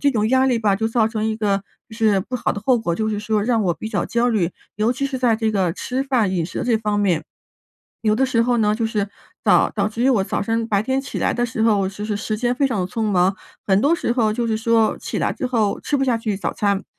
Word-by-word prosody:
这 285 - +3
种 215 -1 +1
压 260 +1 +3
力 250 -3 +2
吧， 205 -3 +2
就 220 - -1
造 225 -1 +2
成 220 -1 -3
一 220 - 0
个 200 -2 0 0.2
就 220 - -11
是 215 -4 +3
不 250 +6 -4
好 - - -1
的 205 - -5
后 255 -3 +4
果， 175 -6 -1
就 220 +4 -1
是 210 -1 -2
说 210 0 0
让 230 0 +1
我 175 - +1
比 220 - -6
较 - - -1
焦 235 +1 +1
虑， 190 -7 0 0.2
尤 220 +3 +2
其 275 +2 -3
是 270 -2 -2
在 240 -3 +3
这 220 0 0
个 190 -5 +1
吃 255 +9 -3
饭 245 -8 +1
饮 175 -3 -1
食 175 - -5
这 235 -3 +1
方 210 -1 -1
面。 180 -6 +1 0.8
有 215 -1 +3
的 260 +5 +2
时 250 -3 +1
候 245 0 +1
呢， 210 -1 +2
就 230 - 0
是 210 -2 -1 0.3
早 - - +4
导 205 -1 +1
致 225 +2 -4
于 - - +4
我 235 -7 +3
早 - - -2
上 225 +2 -1
白 200 -2 +2
天 260 +5 0
起 270 - -6
来 - - 0
的 240 - 0
时 230 -2 -4
候， 220 -3 +4
我 190 - 0
其实 205 +2 -4
时 215 +1 -3
间 245 +2 0
非 280 - 0
常 235 -7 0
地 180 - -1
匆 225 +5 -4
忙， 190 -2 +2 0.3
很 195 0 +3
多 285 +8 +3
时 340 -8 0
候 220 -4 +1
就 235 +1 -1
是 220 -1 0
说 225 -1 +2
起 - - -4
来 - - 0
之 255 - -3
后 220 -5 0
吃 290 - -1
不 270 - +1
下 245 -3 +2
去 220 -3 -2
早 195 - -3
餐， 200 -1 0
220 Hz, 305 characters per minute, -21 LUFS, 205-240 Hz, 0.8 s, 后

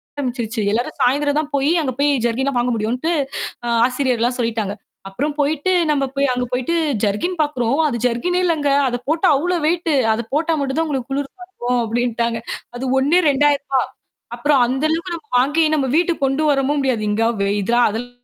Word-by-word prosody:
ஆரம்பிச்சுடுச்சு. 240 -5 -3
எல்லாரும் 245 +7 -2
சாயந்தரம் 285 +3 +2
தான் 305 - -3
போய் 280 +1 +1
அங்க 275 -4 -1
போய் 290 +1 +3 0.2
ஜெர்க்கின்லாம் 255 +3 0
வாங்க 245 +1 0
முடியும்ன்னுட்டு 240 +9 -1 0.5
ஆ - - -2 0.2
ஆசிரியர் 255 -1 0
எல்லாம் 245 +1 +1
சொல்லிட்டாங்க. 225 -4 -1 0.4
அப்புறம் 285 +10 -2
போயிட்டு, 295 +5 +1 0.2
நம்ம 280 -2 +1
போய் 280 0 +2
அங்க 250 0 -1
போயிட்டு 250 +7 -1 0.3
ஜெர்க்கின் 320 - -1
பார்க்கிறோம். 275 -2 0
அது 250 -5 -2
ஜெர்க்கின்னே 350 +10 0
இல்லங்க. 310 -4 +1 0.2
அதைப் 245 0 -4
போட்டா 325 +4 +2
அவ்வளவு 345 +2 -1
வெய்ட். 335 -1 0 0.2
அதைப் 225 +2 -5
போட்டா 320 +2 +1
மட்டும்தான் 280 +4 -1
உங்களுக்குக் 270 -3 -4
குளிர் 280 0 -3
தாங்கும் 250 -10 -2
அப்படின்னுட்டாங்க. 235 0 -1 0.4
அது 260 - -4
ஒண்ணே 295 +7 +3
ரூ.2000. 280 -1 +2 0.6
அப்புறம் 280 +1 +3
அந்த 265 +3 -2
அளவுக்கு 340 +2 -2
நாம 300 -2 -19
வாங்கி, 295 +6 +2
நம்ம 275 -3 0
வீட்டுக்குக் 340 -4 +1
கொண்டு 270 +3 0
வரவும் 280 +1 +1
முடியாது. 255 -5 0
இங்க 220 +2 +1 0.2
வெ 200 - 0
இத 200 +4 -1 0.2
அதெல் 230 +4 -5
270 Hz, 175 wpm, -19 LUFS, 240-300 Hz, 0.6 s, போய்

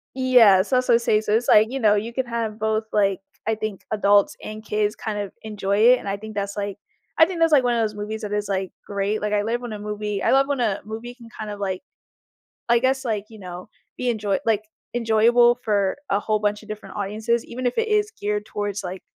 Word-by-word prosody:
Yeah, 245 -8 +6
so 255 +5 +2
so 240 -2 +4
say 220 -2 +2
so 210 - -1
it's 230 +2 +1
like, 215 +1 +6
you 270 - -2
know, 210 -4 +4
you 215 +3 -2
can 260 +1 -1
have 230 -2 -3
both 220 0 0
like, 200 -2 +2 0.3
I 220 - +2
think 215 -2 -5
adults 205 -1 +3
and 215 0 -7
kids 210 0 0
kind 210 -2 -4
of 200 -2 -4
enjoy 200 -2 -2 0.2
it, 255 - +1
and - - -9
I 195 - -2
think 215 +1 -9
that's 200 0 -3
like 200 -1 -3 0.4
I 320 - +8
think 350 0 -5
that's 330 -1 +4
like 275 -4 +5
one 245 -1 +2
of 230 - +1
those 215 -1 -1
movies 210 +2 -5
that 210 -1 -4
is 210 -1 -1
like 190 -1 -2
great, 200 +1 -2
like, 210 0 -1
I 205 - +2
live 235 +3 -1
when 240 -3 -6
a 210 - -6
movie 210 -1 -4
I - - +3
love 270 +1 +4
when 285 -2 -1
a 215 -5 0
movie 225 +3 -7
can 235 -2 -15
kind 215 -1 -5
of 205 - -7
like 190 -2 -2 0.9
I 235 - +5
guess 265 +2 +1
like, 215 -5 -2
you 220 -1 -13
know, 180 +1 -9 0.3
be 250 - -1
enjoy 210 -4 0
like, 215 -2 +2 0.3
enjoyable 240 +1 +4
for 200 -1 +1
a 200 - +2
whole 215 0 0
bunch 210 0 -1
of 215 - -16
different 215 0 -8
audiences 215 +3 -1
even 250 +2 -6
if 245 - 0
it 455 - 0
is 420 0 +1
geared 210 0 -2
towards 205 -2 -4
like, 185 0 -6
215 Hz, 245 wpm, -23 LUFS, 205-235 Hz, 0.9 s, I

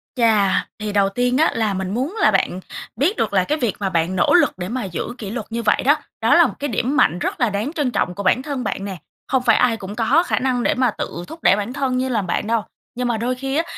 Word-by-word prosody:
Chà, 220 -6 +3
thì 210 -1 -4
đầu 200 -1 +3
tiên 245 +4 0
á 315 - +3
là 220 -3 0
mình 190 0 -3
muốn 265 - -2
là 215 - +5
bạn 185 -1 0 0.4
biết 300 - +1
được 215 - -1
là 190 -2 +3
cái 300 +11 -1
việc 240 -9 -1
mà 195 -2 -1
bạn 170 +1 0
nỗ 180 - +3
lực - - +4
để 180 0 -5
mà 250 +1 -3
giữ 180 -4 -4
kỷ 205 - -6
luật 220 0 -4
như 230 0 -3
vậy 210 - +2
đó, 290 - +6 0.3
đó - - +4
là - - +6
một - - -6
cái 290 - -2
điểm 255 +4 -1
mạnh 175 - +3
rất - - -3
là 240 -3 +2
đáng 210 +9 -3
trân 290 -6 -1
trọng 180 -6 -1
của 200 - -5
bản 200 +7 +3
thân 275 -2 -4
bạn 195 - -3
nè. 195 -2 -5 0.3
Không 265 -2 +1
phải - - +4
ai 240 -2 +2
cũng 200 0 -8
có 250 +9 +3
khả - - 0
năng 250 -2 0
để - - +2
mà 255 -2 +2
tự 170 - -5
thúc 325 - -11
đẩy - - +6
bản 210 +4 -4
thân 265 -2 -1
như 260 +1 -1
là 230 -4 +1
bạn 185 +2 -2
đâu. 225 -1 +1 0.3
Nhưng 250 0 -1
mà 235 -2 0
đôi 245 +3 -1
khi 270 +1 -4
á, 330 - +2
230 Hz, 285 wpm, -20 LUFS, 200-255 Hz, 0.4 s, đó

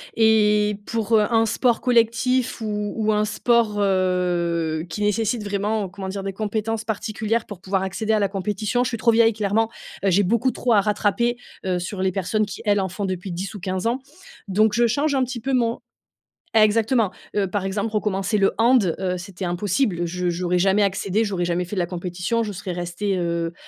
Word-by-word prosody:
et 210 -2 +3
pour, 225 -1 +1
heu, 210 - +4
un 225 0 +4
sport 235 +2 +1
collectif 245 +1 +2
ou 210 -1 -2
ou 215 -1 +1
un 210 0 +2
sport, 225 0 +1
heu, 175 -4 0
qui 210 - -5
nécessite 220 +2 0
vraiment, 205 0 -1
comment 190 0 -6
dire, 195 0 -4
des 195 - -4
compétences 220 +2 -2
particulières 220 +1 -2
pour 200 -4 -10
pouvoir 190 0 -1
accéder 210 +4 -1
à 215 - +3
la 200 - +2
compétition, 205 +4 -1
je 250 - -1
suis 230 - -3
trop 230 +1 +3
vieille, 225 0 +4
clairement. 215 +1 0 0.4
Heu, 195 - +4
j'ai 200 +3 +4
beaucoup 235 +6 +2
trop 240 -2 0
à 205 - +5
rattraper, 215 +4 +1 0.3
heu, 180 -1 0
sur 185 +2 -5
les 190 - +1
personnes 200 +3 0
qui, 200 - -8
elles, 205 -1 +3
en 190 - -1
font 200 +3 -4
depuis 185 0 -4
10 190 +4 -4
ou 205 - -6
15 185 +3 -2
ans. 245 +3 0 0.5
Donc 210 +2 +3
je 235 +1 +3
change 285 +5 +1
un 260 - +2
petit 245 -1 -4
peu 270 +4 -3
mon 235 -2 +1 0.8
exactement! 220 0 +3 0.3
Heu, 200 -1 +2
par 200 0 -2
exemple, 200 +3 -2
recommencer 210 -1 0
le 195 -1 +3
hand, 225 -6 +4
heu, 185 -1 -1
c'était 185 +1 -7
impossible. 180 +1 0
Je 180 +1 -1
j'aurais 180 +1 0
jamais 195 +3 +3
accédé 200 +2 0
j'aurais 190 -4 -1
jamais 175 +1 0
fait 190 +3 -6
de - - -1
la 175 - +1
compétition. 180 +5 -2
Je 215 - -3
serais 190 -1 -5
restée, 175 +3 -2
heu 170 -1 -1
205 Hz, 205 wpm, -23 LUFS, 185-225 Hz, 0.8 s, à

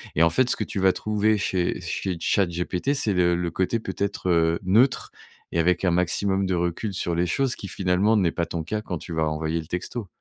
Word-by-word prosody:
et 80 - +4
en 85 - +5
fait, 125 +8 +2
ce - - +3
que - - -2
tu 100 - -4
vas 95 -1 +4
trouver 105 +2 +1
chez 90 -3 -1
chez 90 +1 -3
ChatGPT, 90 +7 0
c'est 125 -8 0
le 90 -1 +3
le 85 -1 -2
côté 95 +6 0
peut-être, 100 -2 -3
heu, 85 -1 +3
neutre 115 +8 +3 0.4
et 85 - 0
avec 90 +3 +2
un 90 - +3
maximum 95 +3 +1
de 95 -1 0
recul 85 +4 -2
sur 90 -3 -2
les 85 +1 +1
choses 130 +8 0
qui, 100 - -8
finalement, 95 +3 +1
n'est 95 -6 +2
pas 85 - -2
ton 85 -1 -4
cas 105 +7 -3
quand 90 -4 -4
tu 85 - -8
vas 80 -1 +1
envoyer 80 +1 -1
le 80 - -8
texto. 100 +5 -4
90 Hz, 230 wpm, -24 LUFS, 85-100 Hz, 0.4 s, en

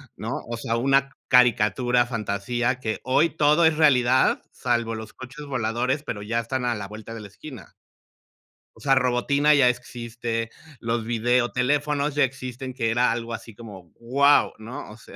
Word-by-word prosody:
¿no?, - - -6 0.2
o 120 0 -4
sea, 115 0 -2
una 135 +2 +2 0.2
caricatura, 120 0 +3
fantasía 120 +2 -2
que 110 -3 -3
hoy 145 +5 +2
todo 155 +1 +3
es 160 -1 +3
realidad, 130 -4 +3
salvo 120 -2 -1
los 110 -1 -8
coches 135 +3 -10
voladores, 125 +3 -1
pero 105 -7 -5
ya 115 +3 -1
están 125 +2 -3
a 120 -2 0
la 100 -1 -6
vuelta 110 +2 -9
de 110 - -8
la 105 - -9
esquina 130 +3 -12 1.0
o - - -18
sea, 135 -1 +2
Robotina 135 +4 +2
ya 135 -4 +5
existe, 120 -2 -4 0.3
los 115 -1 -2
videoteléfonos 125 +5 0
ya 145 - +3
existen, 130 0 -4
que 115 -3 -1
era 120 +1 +2
algo 115 0 -4
así 115 0 -8
como 100 -6 -12
guau, 140 +5 +3
¿no?, 120 +5 -8
o 110 - -12
sea. - - -15
125 Hz, 165 wpm, -24 LUFS, 115-135 Hz, 1.0 s, ya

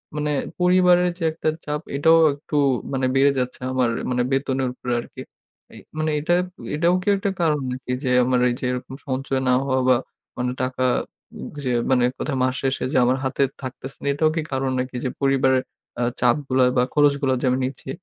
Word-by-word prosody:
মানে 150 0 -1 0.3
পরিবারের 180 0 +4
যে - - -5
একটা 160 0 -1 0.2
চাপ 150 0 -2 0.2
এটাও 160 +3 +5
একটু 145 +1 -5 0.4
মানে 130 -1 0
বেড়ে 140 +1 +5
যাচ্ছে 125 0 -3
আমার 130 -2 +1 0.2
মানে 125 -1 +1
বেতনের 135 -1 0
উপরে 125 -1 -4
আরকি। - - -9 0.5
এ - - -12 0.2
মানে 155 0 0
এটা 155 +4 0 0.4
এটাও 170 +3 +3
কি 180 - -13
একটা 200 +1 -1
কারণ 155 -3 +2
নাকি 125 0 -5
যে 130 - 0
আমার 125 0 +2
এই - - 0
যে - - -4
এরকম 125 +1 -5
সঞ্চয় 135 0 -1
না 125 - +4
হওয়া 130 -1 0
বা 130 - +6 0.4
মানে 125 0 -1
টাকা 130 0 -2 0.8
যে 130 - -1 0.2
মানে 125 -2 +4
কোথায় 140 -3 -2
মাস 130 0 +1
শেষে 135 0 -1
যে - - +3
আমার 130 +2 +2
হাতে 130 +1 -1 0.2
থাকতেছে 135 +1 -8
না - - -4
এটাও 155 +2 +2
কি 165 - 0
কারণ 135 0 -1
নাকি 125 0 -4
যে 130 - 0
পরিবারের 135 -1 +3 0.4
আ - - +1 0.2
চাপগুলা 130 +1 +2
বা 125 - +5
খরচগুলা 140 -2 +3
যে - - -1
আমি 130 +1 +1
নিচ্ছি। 130 0 -7
135 Hz, 190 wpm, -22 LUFS, 130-150 Hz, 0.8 s, বা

